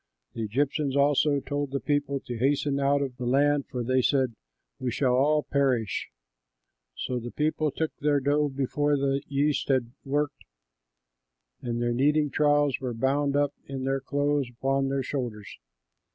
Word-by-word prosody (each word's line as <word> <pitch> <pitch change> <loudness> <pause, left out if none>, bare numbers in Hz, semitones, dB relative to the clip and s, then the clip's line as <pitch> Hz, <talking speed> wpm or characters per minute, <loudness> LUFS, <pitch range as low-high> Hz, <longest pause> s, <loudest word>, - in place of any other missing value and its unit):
The 115 - -5
Egyptians 135 +5 0
also 145 0 +3
told 145 0 -3
the 140 +1 -2
people 145 -1 0
to 120 - -6
hasten 140 +2 +1
out 140 +1 +2
of 130 -3 -5
the 125 - -4
land, 145 +2 +2
for 125 -1 -4
they 130 +2 +2
said, 130 -2 +2 0.5
"We 130 - -2
shall 125 +1 +1
all 150 +4 +3
perish." 130 -6 0 0.9
So 125 -1 -2
the 120 +1 -6
people 155 +2 0
took 160 +2 -3
their 145 -1 +2
dough 145 +2 +1
before 145 +2 0
the 135 0 0
yeast 145 +1 0
had 130 -4 +1
worked, 145 +1 -2 1.2
and 120 -1 -3
their 120 0 +1
kneading 145 +3 +2
troughs 145 -2 +2
were 125 -3 -3
bound 140 +4 +1
up 145 0 +2
in 135 -1 -5
their 135 0 0
clothes 145 -1 0
upon 135 +3 0
their 135 0 -1
shoulders. 120 -6 -5
140 Hz, 160 wpm, -27 LUFS, 130-145 Hz, 1.2 s, also